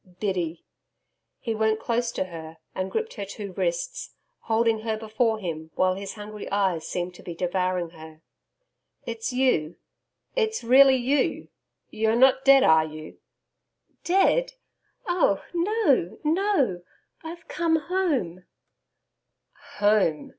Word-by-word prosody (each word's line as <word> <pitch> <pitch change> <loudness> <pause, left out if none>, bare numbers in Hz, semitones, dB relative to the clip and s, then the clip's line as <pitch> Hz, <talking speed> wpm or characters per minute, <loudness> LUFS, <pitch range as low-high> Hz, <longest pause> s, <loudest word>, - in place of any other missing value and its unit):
'Biddy!' 175 -5 -2 0.7
He 230 - -3
went 220 0 +1
close 235 0 -1
to - - -1
her 165 -3 -9 0.2
and 190 0 -3
gripped 450 0 -3
her 205 -4 -5
two 200 -1 -8
wrists, - - -3 0.2
holding 225 0 +1
her 220 0 -2
before 220 +1 0
him 160 -5 -5
while 185 0 +2
his 195 +2 -7
hungry 210 0 -8
eyes 190 -5 0
seemed 180 0 -3
to - - -14
be 175 - -8
devouring 180 -1 -1
her. 160 -1 -13 0.8
'It's 230 +1 -4
you 250 -12 +1 0.6
it's 445 - 0
really 265 +3 +7
you. 260 +2 0 0.4
You're 220 +1 +1
not 260 +2 +4
dead, 275 -1 +7
are 160 -9 +5
you?' 155 0 -10 0.8
'Dead! 390 +7 +2 0.5
Oh 350 - +1
no 345 - +1
no.... 310 - +1 0.4
I've 335 +1 -9
come 335 -2 +1
home.' 295 - -1 1.3
'Home!' 205 -7 +2
220 Hz, 125 wpm, -25 LUFS, 180-275 Hz, 1.3 s, really